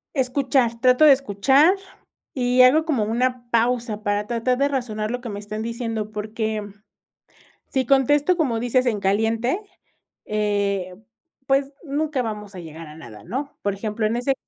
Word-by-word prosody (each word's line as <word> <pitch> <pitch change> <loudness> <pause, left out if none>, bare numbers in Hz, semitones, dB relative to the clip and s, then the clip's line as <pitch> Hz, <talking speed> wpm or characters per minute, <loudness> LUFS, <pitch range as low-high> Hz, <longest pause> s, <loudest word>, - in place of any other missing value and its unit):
Escuchar, 260 -2 +1
trato 255 +4 +5
de 295 - +9
escuchar, 270 - +3 0.6
y 250 -1 +3
hago 285 +5 +5
como 275 -9 +1
una 245 +2 -1
pausa 235 -2 0
para 205 0 -1
tratar 240 +2 0
de 280 +2 +2
razonar 230 -6 -3
lo 245 +2 -3
que 245 - -6
me 205 -1 -5
están 215 +1 -6
diciendo. 225 -2 -4
Porque 215 0 -3 1.0
si 265 -1 -1
contesto, 285 +6 +3
como 250 -8 0
dices, 245 +2 +1
en 215 -3 0
caliente, 225 - +1 0.7
eh, 200 -3 -1 0.5
pues, 275 +1 +1
nunca 295 -2 -1
vamos 210 -3 -6
a 185 - -7
llegar 165 0 -10
a 150 - -11
nada, 115 -9 -12
¿no?, 265 +10 -5
por 200 -1 0
ejemplo, 215 +2 -2
en 225 - 0
ese 250 +3 0
235 Hz, 155 wpm, -23 LUFS, 210-265 Hz, 1.0 s, de